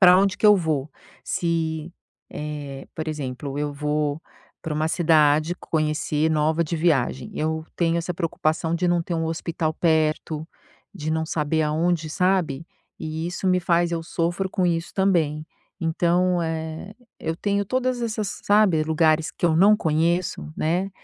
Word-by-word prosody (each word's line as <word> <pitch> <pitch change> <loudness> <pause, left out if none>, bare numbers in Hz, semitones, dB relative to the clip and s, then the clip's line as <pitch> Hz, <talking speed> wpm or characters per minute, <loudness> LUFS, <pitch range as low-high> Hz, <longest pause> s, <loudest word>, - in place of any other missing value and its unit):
pra 180 -1 +8
onde 195 0 +2
que - - +4
eu 210 -1 +8
vou, 155 -5 -1 0.3
se, 165 -1 -1 0.4
eh, 145 -2 -6
por 160 - -4
exemplo, 140 -2 -4
eu 145 0 -1
vou 150 +1 -1 0.4
pra 160 -3 -3
uma 155 +1 0
cidade 155 -1 +3
conhecer 155 -1 0
nova 155 +2 +2
de 165 +2 -3
viagem. 135 -6 +1
Eu 160 +1 -2
tenho 170 -1 +2
essa 170 +1 -2
preocupação 165 -1 -1
de 175 +1 +1
não 175 -1 +2
ter 170 - -4
um 165 -1 -1
hospital 160 -1 -2
perto, 155 -1 0 0.5
de 155 +1 -4
não 160 0 0
saber 155 0 0
aonde, 160 +1 0
sabe, 175 -5 0 0.3
e 160 +1 -4
isso 175 +2 -4
me 180 0 +3
faz 175 -1 +2
eu 165 -1 -1
sofro 175 +3 -2
com 185 -1 +1
isso 170 0 -1
também. 160 -6 +1 0.4
Então, 175 +2 +2
eh, 160 +3 -4 0.3
eu 160 - -2
tenho 200 +2 0
todas 255 +2 -1
essas 215 -3 -3
sabe, 205 -6 +4
lugares 155 0 +2
que - - -1
eu 160 -2 +2
não 200 +5 +6
conheço, 160 - 0
né, 180 +5 0
160 Hz, 155 wpm, -24 LUFS, 155-175 Hz, 0.5 s, pra